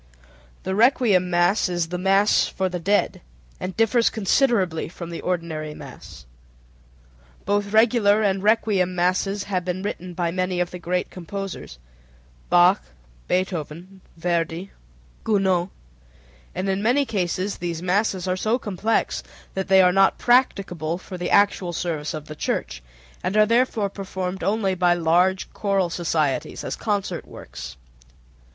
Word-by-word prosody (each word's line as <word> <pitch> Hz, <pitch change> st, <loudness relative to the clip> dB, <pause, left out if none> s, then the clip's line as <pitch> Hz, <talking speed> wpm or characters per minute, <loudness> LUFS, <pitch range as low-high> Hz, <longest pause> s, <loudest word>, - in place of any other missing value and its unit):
The 190 Hz, -, -2 dB
requiem 215 Hz, -5 st, +3 dB
mass 175 Hz, +3 st, +2 dB
is 175 Hz, -2 st, -1 dB
the 180 Hz, 0 st, -3 dB
"mass 195 Hz, +2 st, +3 dB
for 190 Hz, -1 st, -2 dB
the 180 Hz, -1 st, -4 dB
dead" 200 Hz, +4 st, 0 dB, 0.4 s
and 185 Hz, 0 st, -5 dB
differs 230 Hz, +1 st, +3 dB
considerably 200 Hz, -, +1 dB
from 170 Hz, 0 st, -8 dB
the 170 Hz, -, -6 dB
ordinary 160 Hz, -4 st, -3 dB
mass. -, -, -12 dB, 1.2 s
Both 205 Hz, 0 st, 0 dB
regular 220 Hz, -1 st, +4 dB
and 195 Hz, -2 st, +1 dB
requiem 205 Hz, -4 st, +2 dB
masses 185 Hz, +3 st, 0 dB
have 185 Hz, -3 st, -2 dB
been 185 Hz, +1 st, -3 dB
written 185 Hz, -3 st, -5 dB
by 170 Hz, -1 st, -1 dB
many 185 Hz, 0 st, -1 dB
of 175 Hz, 0 st, -1 dB
the 180 Hz, -, -7 dB
great 180 Hz, +1 st, -2 dB
composers 190 Hz, -, -7 dB, 0.7 s
(Bach, 180 Hz, +3 st, +5 dB, 0.5 s
Beethoven, 180 Hz, 0 st, -3 dB, 0.2 s
Verdi, 170 Hz, +2 st, -2 dB, 0.5 s
Gounod), 190 Hz, -4 st, +1 dB, 0.9 s
and 185 Hz, +2 st, -2 dB
in 195 Hz, 0 st, 0 dB
many 250 Hz, +6 st, +2 dB
cases 190 Hz, -2 st, -2 dB
these 170 Hz, -1 st, -4 dB
masses 190 Hz, 0 st, 0 dB
are 185 Hz, -, +1 dB
so 220 Hz, +5 st, 0 dB
complex 215 Hz, -1 st, -1 dB, 0.3 s
that 190 Hz, 0 st, -3 dB
they 190 Hz, -1 st, +6 dB
are 180 Hz, 0 st, +4 dB
not 195 Hz, 0 st, +4 dB
practicable 190 Hz, -, +1 dB
for 185 Hz, +1 st, -9 dB
the 175 Hz, -1 st, -3 dB
actual 200 Hz, -3 st, +3 dB
service 160 Hz, -3 st, -3 dB
of 155 Hz, -1 st, -7 dB
the 155 Hz, -, -9 dB
Church, 60 Hz, -, -3 dB, 0.4 s
and 195 Hz, +3 st, -1 dB
are 215 Hz, -, +6 dB
therefore 230 Hz, -2 st, +2 dB
performed 190 Hz, -1 st, -5 dB
only 200 Hz, -2 st, +1 dB
by 175 Hz, -1 st, +3 dB
large 175 Hz, +3 st, +1 dB
choral 195 Hz, -4 st, 0 dB
societies, 155 Hz, -5 st, -1 dB
as -, -, -3 dB
concert 205 Hz, -3 st, -2 dB
works. -, -, -9 dB
185 Hz, 140 wpm, -23 LUFS, 175-205 Hz, 1.2 s, they